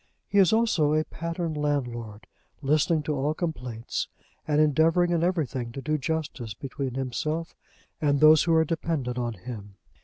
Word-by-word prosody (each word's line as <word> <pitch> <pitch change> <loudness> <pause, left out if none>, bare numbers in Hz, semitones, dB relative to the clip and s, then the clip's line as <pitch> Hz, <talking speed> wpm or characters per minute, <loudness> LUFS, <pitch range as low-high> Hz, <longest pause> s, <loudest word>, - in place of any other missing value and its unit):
He 200 - +2
is 185 -3 +6
also 220 -10 +3
a 155 - +2
pattern 170 0 -4
landlord, 120 -8 -2 0.4
listening 155 +3 +2
to 150 - -1
all 145 +2 0
complaints, 125 -9 -3 0.4
and 150 -1 +2
endeavouring 160 +4 +3
in 170 -1 +1
everything 140 -9 -1
to 135 - -5
do 155 0 0
justice 135 -7 -3
between 135 -1 -5
himself 155 +5 -3 0.5
and 145 -2 +2
those 155 +1 +7
who 165 -1 +3
are 160 0 +4
dependent 150 -6 -2
on 120 -1 -2
him. 105 -1 -9
150 Hz, 155 wpm, -27 LUFS, 125-160 Hz, 0.5 s, those